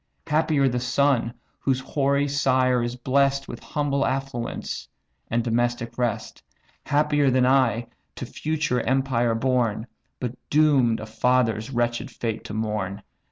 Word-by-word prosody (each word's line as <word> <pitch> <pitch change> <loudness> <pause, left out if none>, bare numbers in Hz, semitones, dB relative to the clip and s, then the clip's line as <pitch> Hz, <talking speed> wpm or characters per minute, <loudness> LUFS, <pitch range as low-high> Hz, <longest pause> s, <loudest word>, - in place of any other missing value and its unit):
Happier 150 -3 +2
the 125 -1 0
son, 125 -1 +1 0.3
whose 130 -2 0
hoary 140 +1 +1
sire 130 -3 +2
is 120 +1 -2
bless'd 135 +2 +1
With 120 - -7
humble 140 -2 -1
affluence, 135 -3 -3 0.4
and 115 +1 +1
domestic 120 0 -1
rest! 120 -3 -2 0.5
Happier 145 -1 +3
than 130 0 +3
I, 125 -3 +3 0.3
to - - -5
future 150 -5 -1
empire 125 -2 +1
born, 120 -3 0 0.3
But 125 -2 -3 0.2
doom'd 140 -7 +3
a - - -5
father's 115 0 +1
wretch'd 120 0 -1
fate 115 -2 -4
to - - -7
mourn!" 105 -3 -3
125 Hz, 130 wpm, -24 LUFS, 120-140 Hz, 0.5 s, Happier